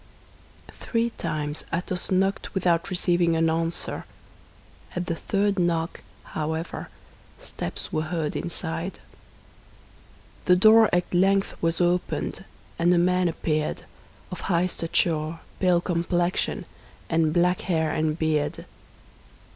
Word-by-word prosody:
Three 235 0 0
times 150 -7 -3
Athos 180 +1 -2
knocked 195 +2 0
without 175 -1 +2
receiving 175 -2 +2
an 165 0 +3
answer. 165 +1 -2 0.9
At 180 0 -2
the 170 - -1
third 200 +3 0
knock, 165 -1 0 0.2
however, 160 +2 -4 0.5
steps - - -6
were 155 - +1
heard 160 -4 -2
inside. 170 +1 -3 1.5
The 180 - +6
door 220 +3 +7
at 175 +1 0
length 195 +2 +3
was 165 0 +1
opened, 175 0 0 0.4
and 170 +1 +4
a 180 - +4
man 180 +1 +3
appeared, 155 -2 -1 0.5
of 180 - -6
high 175 -1 +3
stature, 165 -2 0 0.2
pale 180 -2 +3
complexion, 175 +1 0 0.4
and 160 -2 +2
black 180 +2 +2
hair 160 -3 0
and 155 0 0
beard. 160 +1 0
175 Hz, 115 wpm, -25 LUFS, 165-180 Hz, 1.5 s, door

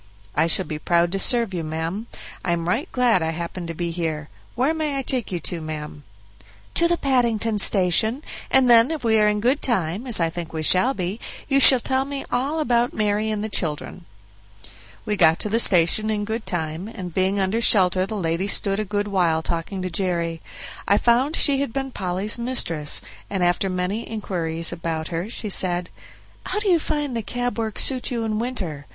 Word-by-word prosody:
"I 160 +2 +2
shall 180 +3 +1
be 155 -2 -5
proud 170 +1 +1
to 195 - -2
serve 230 -2 +2
you, 170 -2 -3
ma'am; 165 +8 -4 0.4
I 175 - 0
am 170 -1 -3
right 240 - -1
glad 245 -7 +2
I 160 - -1
happened 170 +2 -5
to 165 - -6
be 170 +1 -3
here. 160 -3 -4 0.3
Where 260 +6 +1
may 305 -3 -2
I 270 - -2
take 250 -5 0
you 175 - -2
to, 170 -2 -4
ma'am?" 150 -2 -7 0.7
"To 340 - +3
the 345 0 +1
Paddington 230 -6 +1
Station, 210 - +3 0.3
and 265 -1 +4
then 235 0 +6
if 320 -4 -4
we 220 -1 +3
are 210 - +4
in 210 0 +1
good 255 +7 +1
time, 205 -1 -1
as 235 -6 +1
I 165 -1 +1
think 170 -1 -7
we 160 -1 -3
shall 240 - +4
be, 185 +4 -4 0.3
you 275 -1 +3
shall 265 -2 +9
tell 260 +2 0
me 280 -1 -6
all 275 +6 -1
about 245 -5 +1
Mary 210 0 0
and 215 -1 -2
the - - -2
children." 170 -2 -3 1.0
We 210 - 0
got 160 -4 +4
to 210 - -1
the 225 +3 +2
station 190 +2 +4
in 210 -1 -1
good 220 +1 -4
time, 160 +1 -3
and 185 -6 -8
being 190 +2 +1
under 195 +4 0
shelter 185 -4 +4
the 215 - -5
lady 170 +1 -1
stood 200 0 +2
a - - 0
good 205 +1 -2
while 170 -5 +1
talking 175 +3 -4
to 185 - -3
Jerry. 170 -2 -2 0.5
I 200 - +4
found 250 +8 +2
she 280 -2 +3
had 280 - -2
been 270 +1 -4
Polly's 190 +3 -1
mistress, 170 - -1 0.3
and 195 -3 -1
after 175 +2 +1
many 185 +5 -3
inquiries 170 -6 -1
about 165 -2 -4
her 170 +4 -4
she 220 -2 -5
said: 180 -2 +1 0.6
"How 375 - -2
do 420 -1 -1
you 345 -2 +4
find 295 -4 -3
the 230 - -1
cab 245 +2 -3
work 220 -2 -3
suit 260 -2 +3
you 235 -3 -2
in 215 -1 -2
winter? 185 - -4
205 Hz, 205 wpm, -22 LUFS, 170-240 Hz, 1.0 s, shall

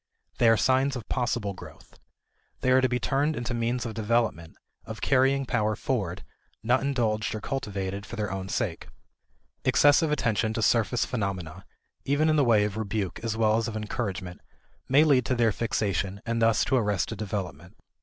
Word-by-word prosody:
They 115 - +5
are 115 - +5
signs 135 +1 +2
of 120 -4 -7
possible 120 -5 -1
growth. 95 - -14 0.6
They 130 - +2
are 130 +1 +5
to 130 - +2
be 125 0 0
turned 145 +5 0
into 120 -1 -3
means 120 +1 -1
of 115 - -4
development, 110 -7 -1 0.3
of 110 -1 -8
carrying 135 +2 +2
power 110 -4 0
forward, 100 -7 -3 0.4
not 120 +3 +2
indulged 115 -7 -1
or - - -4
cultivated 100 -6 -4
for - - -7
their 105 -4 -3
own 95 -1 -5
sake. - - -3 0.8
Excessive 145 +2 +4
attention 110 -6 0
to 115 - -1
surface 115 +2 +2
phenomena 95 -9 -4 0.4
(even 145 +3 +2
in - - +2
the 145 - +4
way 115 -4 +4
of 105 0 -3
rebuke 100 -4 -3
as 110 -1 -2
well 110 -1 +3
as 115 - -1
of 110 -1 -4
encouragement) 105 -4 -4 0.5
may 140 +4 +6
lead 140 -5 +4
to 130 - +1
their 115 -2 +3
fixation 100 -3 -2
and 115 0 -1
thus 115 -1 +3
to - - +1
arrested 105 -2 -1
development. 90 -6 -5
115 Hz, 175 wpm, -27 LUFS, 105-125 Hz, 0.8 s, may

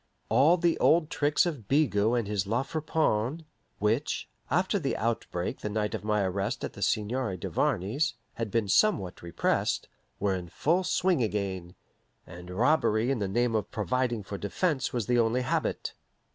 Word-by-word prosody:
All 140 +10 +5
the 170 -1 +1
old 160 0 +4
tricks 145 +3 +2
of 145 - -4
Bigot 120 -5 +2
and 115 -4 -1
his 100 -2 -1
La 115 +5 +1
Friponne, 155 -2 -1 0.3
which, 110 +8 0 0.2
after 185 +7 +1
the 140 -6 -1
outbreak 110 -6 -2
the 105 - -4
night 105 0 -1
of - - -4
my 105 -1 +1
arrest 100 +5 -2
at - - -4
the 100 - -11
Seigneur 110 -1 0
Duvarney's, 110 - 0 0.2
had 115 -2 -3
been 110 0 0
somewhat 100 - +2
repressed, 85 -1 0 0.3
were 100 -1 +1
in 90 -2 -4
full 170 - +1
swing 180 -3 +1
again, 95 -5 -2 0.5
and 90 +1 -11
robbery 115 +2 +2
in 135 - 0
the 100 - -1
name 120 +4 +1
of 105 -2 -1
providing 120 0 -1
for 100 +1 -6
defense 135 - -1
was 120 -4 -1
the 120 +2 +2
only 115 +2 +2
habit. - - -1
115 Hz, 165 wpm, -28 LUFS, 100-145 Hz, 0.5 s, All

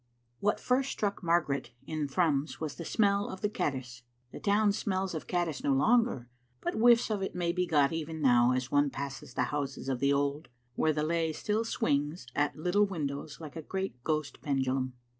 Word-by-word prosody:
What 205 +1 +1
first 260 +2 +1
struck 205 -1 -2
Margaret 145 -8 0
in 155 -1 -2
Thrums 150 -1 0
was 155 -2 -3
the 170 - -7
smell 200 0 +2
of 190 - -7
the 210 - +1
caddis. 130 - -3 0.3
The - - -8
town 205 0 +3
smells 195 -2 -1
of 160 - -5
caddis 175 -4 -1
no 140 - +3
longer, 220 - +3 0.3
but - - -2
whiffs 235 0 +5
of 205 -2 -1
it 190 - -3
may 175 -1 0
be 180 0 0
got 145 -2 +3
even 160 0 -4
now 125 -4 +5
as 130 0 -1
one 145 0 +3
passes 135 -2 -6
the 125 - +2
houses 140 -2 -3
of 130 -2 -1
the 140 +2 +3
old, 140 +1 0 0.2
where 155 - +2
the 150 0 -1
lay 165 0 +1
still 210 +7 -1
swings 150 - -1
at 145 0 +1
little 180 +6 +2
windows 145 -5 -4
like 155 -2 -9
a 160 - -4
great 190 -7 -4
ghost 155 -2 -2
pendulum. 130 -2 0
155 Hz, 195 wpm, -30 LUFS, 140-190 Hz, 0.3 s, whiffs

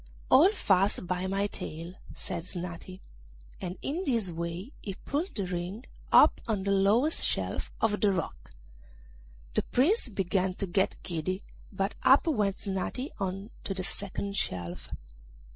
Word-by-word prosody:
'Hold 365 +10 +7
fast 195 - +2
by 180 +1 -1
my 195 +1 +1
tail,' 170 -3 -5 0.2
said 170 - -4
Snati; 180 +1 -6 0.6
and 180 +1 -4
in 315 +6 -1
this 230 - 0
way 170 +7 -4
he 195 -3 -5
pulled 305 - -3
Ring 185 +3 -3 0.3
up - - +7
on 210 -4 0
the 200 - +1
lowest 210 +10 +4
shelf - - -1
of 210 -2 +1
the 205 - +5
rock. 185 -4 -3 1.0
The - - +2
Prince 290 - +2
began 190 -2 0
to 195 - -2
get 190 +1 +1
giddy, 185 +3 -2 0.3
but 195 0 -1
up 270 - +6
went 210 - +1
Snati 200 +8 -2
on 195 +3 -3
to 195 - -2
the 185 - -2
second 200 +1 -3
shelf. 90 -1 -2
195 Hz, 145 wpm, -30 LUFS, 180-215 Hz, 1.0 s, Hold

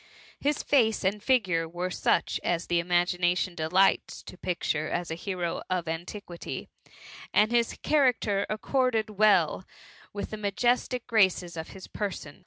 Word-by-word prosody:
His 295 +1 0
face 225 -8 +2
and 200 +2 0
figure 185 -10 +1
were 175 +2 -3
such - - +1
as 170 -1 0
the 175 0 +1
imagination 175 +1 +1
delights 175 +4 +1
to - - -10
picture 165 -4 -2
as 175 -2 -3
a - - 0
hero 175 -1 -3
of 180 -2 -1
antiquity; 175 +2 -6 0.7
and 215 +2 +4
his 235 -1 +1
cha 305 - +3
racter 225 -7 +2
accorded 225 0 0
well 195 -6 +3 0.5
with 205 - -5
the 215 - -4
majestic 240 +4 0
graces 190 -6 +2
of 160 -1 -5
his 190 - -11
person. 190 -8 -5
190 Hz, 145 wpm, -28 LUFS, 175-215 Hz, 0.7 s, and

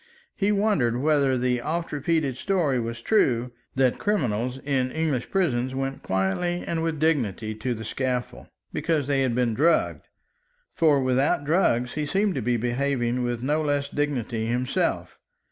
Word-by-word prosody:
He 205 0 +1
wondered 200 - +1
whether 140 -2 +2
the 125 0 0
oft 165 +5 -2
repeated 150 -2 0
story 160 -6 0
was 115 0 -5
true, 125 - +2 0.2
that 130 -1 +2
criminals 125 - 0
in 130 -3 0
English 155 -5 -1
prisons 130 -9 0
went 135 0 -3
quietly 95 - -1
and 165 -1 -2
with 165 -1 -1
dignity 115 - 0
to 120 +3 -3
the 110 0 -7
scaffold, 125 +1 -3 0.3
because 155 -4 0
they 140 -1 +1
had 130 -3 +1
been 120 -2 +1
drugged. 160 +9 +1 0.7
For 155 -4 +4
without 130 +3 +1
drugs 125 -7 +2
he 150 -1 -2
seemed 195 +5 +1
to - - -2
be 120 +2 +1
behaving 125 0 0
with 120 -1 -2
no 150 +4 +1
less 145 -2 0
dignity 125 -7 -2
himself. 125 +2 -1
135 Hz, 155 wpm, -25 LUFS, 120-155 Hz, 0.7 s, For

